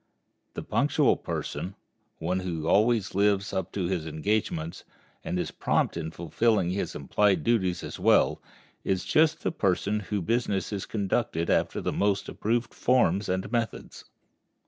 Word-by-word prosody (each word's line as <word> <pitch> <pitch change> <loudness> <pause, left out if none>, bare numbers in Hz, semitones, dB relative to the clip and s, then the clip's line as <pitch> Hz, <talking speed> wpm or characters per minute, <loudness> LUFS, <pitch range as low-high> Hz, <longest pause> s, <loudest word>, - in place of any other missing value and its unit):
The - - -4
punctual - - +2
person, 95 +2 -5 0.4
one 90 +3 -1
who 85 -4 -3
always 110 +1 +3
lives 100 +1 +2
up 95 - -2
to 95 -3 -1
his 85 -3 -2
engagements, 80 0 -2 0.4
and - - -2
is 90 - -2
prompt - - 0
in 80 - -3
fulfilling 90 +3 +1
his 100 - -3
implied 95 +8 +2
duties 95 -7 +1
as - - -7
well, - - +3 0.4
is 95 -1 -1
just 155 +1 +3
the - - 0
person 100 - 0
whose 105 0 -3
business 105 -1 0
is 100 - -4
conducted 100 -5 -1
after - - +1
the - - -2
most 100 -1 +1
approved 120 +2 -1
forms 105 -6 +2
and 95 +3 -2
methods. 115 -3 -3
100 Hz, 145 wpm, -27 LUFS, 90-110 Hz, 0.4 s, always